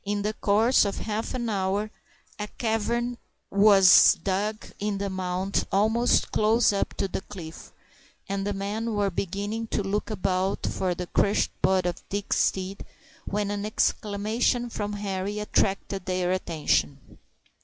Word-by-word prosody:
In 205 0 -2
the 210 +1 -1
course 220 +4 +3
of 200 -1 -2
half 220 +2 -3
an 240 -2 -2
hour 200 0 -1 0.5
a 210 - -3
cavern 235 +2 -1 0.3
was 200 -2 +7
dug 205 +3 -1
in 205 -1 -1
the 200 0 -3
mound 185 +1 -2
almost 220 +5 +2
close 220 +1 +3
up 200 - -2
to 195 - -1
the 190 - -4
cliff, 175 -6 -10 0.6
and 195 0 -2
the - - 0
men 210 +3 -3
were 200 -1 +1
beginning 205 +5 -3
to 210 - -1
look 205 +3 -2
about 190 -2 -1
for 185 -2 -1
the 180 - -4
crushed 200 +3 +1
body 185 -1 +2
of 175 - -9
Dick's 200 0 -1
steed, 190 +1 -2 0.4
when 205 0 -1
an 205 0 -3
exclamation 215 +3 0
from 210 -1 -3
Henri 200 0 -3
attracted 195 -2 -1
their 180 -1 0
attention. 155 -6 -1
200 Hz, 145 wpm, -26 LUFS, 190-215 Hz, 0.6 s, was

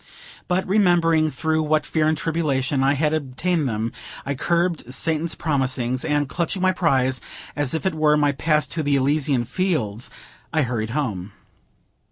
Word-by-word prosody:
But, 180 +1 0
remembering 175 -5 +3
through 160 +3 0
what 155 0 +1
fear 155 -1 +1
and 155 0 +1
tribulation 145 -5 0
I 140 +1 +3
had 150 +2 +1
obtained 155 +1 -1
them, 110 +1 -2 0.3
I 140 - -1
curbed 170 -1 0
Satan's 160 +4 0
promptings, 130 -4 0
and, 145 -2 0
clutching 170 +5 -2
my 185 0 +3
prize, 130 -8 +1 0.3
as 145 0 0
if 160 - -3
it 190 - +1
were 155 -1 +3
my 145 -1 +3
pass 150 +1 +1
to 165 - -2
the 145 -2 +1
Elysian 140 -2 +1
Fields, 125 - -1 0.4
I 155 -2 +2
hurried 115 -3 -2
home. 105 -9 -3
150 Hz, 160 wpm, -22 LUFS, 130-165 Hz, 0.4 s, remembering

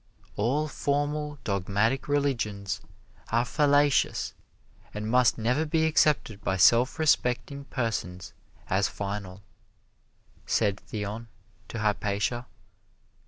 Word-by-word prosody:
"All 135 +9 +1
formal 145 +1 -1
dogmatic 100 +6 0
religions 115 -9 -1 0.5
are 120 +2 +2
fallacious 145 +1 +2 0.6
and 105 +1 -3
must 125 +1 +4
never 125 +7 +1
be 160 0 +1
accepted 150 -9 +2
by 95 +2 0
self 120 - +5
respecting 140 -2 +1
persons 105 -9 -3 0.3
as 95 +1 +2
final," 100 -1 -5 1.0
said 100 -3 +1
Theon 105 +2 -5 0.4
to - - -6
Hypatia. 105 +3 -1
115 Hz, 95 wpm, -27 LUFS, 100-145 Hz, 1.0 s, self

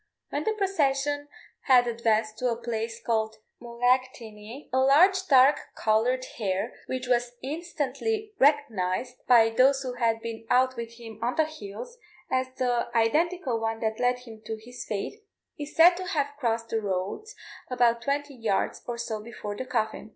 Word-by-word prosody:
When - - -2
the 440 - +1
procession 290 -8 0 0.4
had 250 -2 +6
advanced 225 -2 0
to 250 - +1
a 235 - 0
place 230 -1 -3
called 220 -1 -1 0.3
Mullaghtinny, 240 -1 -2
a 260 - +3
large 365 +9 +5
dark 270 +1 +6 0.2
coloured 240 +4 +1
hare, 200 +2 -1
which 255 0 -3
was 245 -1 +1
instantly 345 - -3
recognised, 250 -5 +1
by 225 -2 +6
those 270 +4 +4
who 255 -1 -4
had 230 -2 +1
been 225 -1 -6
out 255 +1 +3
with 235 -1 -6
him 225 -2 -11
on 240 +2 -1
the 315 - +3
hills, 310 - -9 0.3
as 260 0 +1
the 245 -2 0
identical 295 +2 +1
one 225 0 -2
that 220 -1 -1
led 245 0 +2
him 230 -3 -12
to 220 - -3
his 245 +3 -10
fate, 215 - -4 0.4
is 290 0 -7
said 345 +2 +7
to 370 - -5
have 285 -4 -1
crossed 230 -3 -1
the 225 - -1
roads 200 - -3 0.3
about 240 -2 +2
twenty 285 +1 -2
yards 225 -6 -1
or 240 -1 -3
so 220 -2 -4
before 215 -2 -7
the 260 - -5
coffin. 220 -3 -2
245 Hz, 165 wpm, -27 LUFS, 225-280 Hz, 0.4 s, said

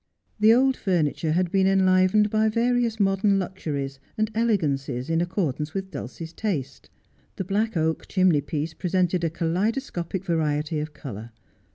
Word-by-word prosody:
The 215 +1 +6
old 260 +2 +4
furni 175 -7 +1
ture 155 -2 -1
had 180 0 +1
been 190 -1 +3
enlivenedby 195 +3 +3
variousmodern 220 -4 +2
luxuries 145 -8 -4 0.2
and 215 0 0
elegancies 145 - 0
in 165 +1 +2
accordance 160 -4 -2
with 190 -1 -4
Dulcie's 160 +6 -7
taste. 175 - -4 0.5
The - - -3
black 210 +2 -1
oak 160 0 -1
chimney 185 -6 +3
piece 150 +2 -3
presented 180 0 0
a 165 - +2
kaleidoscopic 180 - -2
variety 155 -2 0
of 150 0 -5
colour. 115 -6 -8
180 Hz, 140 wpm, -25 LUFS, 155-205 Hz, 0.5 s, The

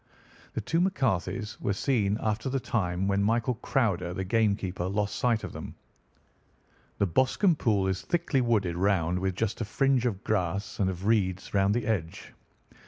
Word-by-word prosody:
"The - - -1
two 165 +1 0
McCarthys 120 - -1
were 100 - 0
seen 105 -2 +1
after 110 +4 -1
the 135 +1 0
time 95 -6 -1
when 100 0 +1
William 120 +2 +1
Crowder, 90 -9 0
the 95 - -2
game 110 +1 +2
keeper, 90 -2 -4
lost 100 +1 -1
sight 120 -3 +1
of - - -6
them. - - -8 1.2
The - - +2
Boscombe 130 - +2
Pool 105 -5 +2
is 95 0 -1
thickly 165 -6 0
wooded 105 -8 +1
round, 90 -2 +1
with 95 0 -1
just 110 +2 -2
a - - 0
fringe 130 +2 +2
of 100 -5 -3
grass 100 -1 -1
and 95 -2 +2
of 95 +1 -5
reeds 95 -4 +1
round 100 +1 +3
the 120 -2 -1
edge. 90 -8 -3
105 Hz, 170 wpm, -28 LUFS, 95-120 Hz, 1.2 s, round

